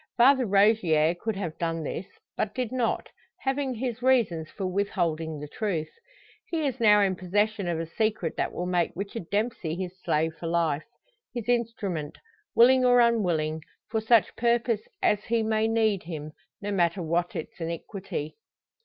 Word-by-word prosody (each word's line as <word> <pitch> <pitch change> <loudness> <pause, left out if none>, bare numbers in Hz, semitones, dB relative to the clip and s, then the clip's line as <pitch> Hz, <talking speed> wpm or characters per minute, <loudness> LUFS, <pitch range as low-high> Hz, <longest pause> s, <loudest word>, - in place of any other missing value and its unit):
Father 255 0 +5
Rogier 190 -6 +4
could 215 +5 -3
have 170 -5 -5
done 165 -1 -1
this; 175 +5 -4 0.3
but 210 - -2
did 250 -3 -2
not, 250 -3 -1 0.3
having 270 -1 -1
his 245 0 -3
reasons 225 -12 +2
for 195 - -5
withholding 170 -5 -1
the 150 - -6
truth. 165 -2 -2 0.6
He 320 -3 -1
is 265 -2 -2
now 210 -2 +6
in 190 -2 +2
possession 205 +2 0
of 170 -2 -1
a 165 - -2
secret 210 -1 -1
that - - -1
will 175 - -4
make 180 -2 +1
Richard 200 -1 -5
Dempsey 205 -6 -1
his 185 0 -5
slave 160 +1 +1
for 170 - -4
life 165 -3 0 0.5
his 240 -2 -4
instrument, 215 -10 -1 0.4
willing 255 +2 +6
or 245 -1 +6
unwilling, 175 -10 +2 0.3
for 220 -1 0
such 220 0 +4
purpose 235 -2 +1 0.2
as 210 0 +2
he 230 -1 +1
may 220 0 +1
need 220 -4 +2
him, 155 -3 -6 0.3
no 205 - -2
matter 175 -1 +1
what 170 +2 -1
its 160 - -6
iniquity. 165 -2 -5
200 Hz, 160 wpm, -27 LUFS, 165-230 Hz, 0.6 s, now